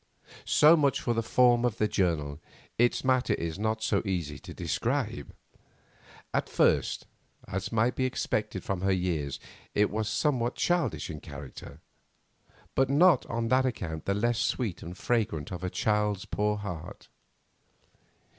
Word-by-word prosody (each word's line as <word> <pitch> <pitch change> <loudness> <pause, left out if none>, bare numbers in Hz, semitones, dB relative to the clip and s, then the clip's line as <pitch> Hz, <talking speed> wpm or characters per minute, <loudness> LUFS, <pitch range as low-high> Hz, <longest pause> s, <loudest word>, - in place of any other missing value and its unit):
So 155 +3 +6
much 140 -4 +2
for 120 - 0
the 115 - 0
form 120 +1 +4
of 120 -3 0
the 105 - +2
journal, 80 -8 0 0.4
its 120 0 +3
matter 130 -1 +2
is 85 +2 -4
not 110 +1 -1
so - - +2
easy 85 -8 -3
to - - -11
describe. - - -2 1.0
At - - 0
first, - - +2 0.4
as 95 0 -4
might 115 +2 +2
be 130 - 0
expected 130 - -2
from 95 -2 -2
her 95 +1 +2
years, 85 -7 -1 0.4
it 105 0 +3
was 110 +1 -1
somewhat 125 -5 0
childish 170 - 0
in 75 - -7
character, 70 -2 -10 0.9
but 135 -1 +2
not 155 +1 +5
on 115 0 -2
that 130 +1 +3
account 80 -10 -4
the 100 - +1
less 120 +2 +1
sweet 115 -9 -1
and 90 +3 -8
fragrant 100 -9 -1
of 90 0 -6
a 90 - -1
child's 105 -1 0
poor 105 0 0
heart. 90 -6 -7
105 Hz, 150 wpm, -29 LUFS, 90-120 Hz, 1.0 s, So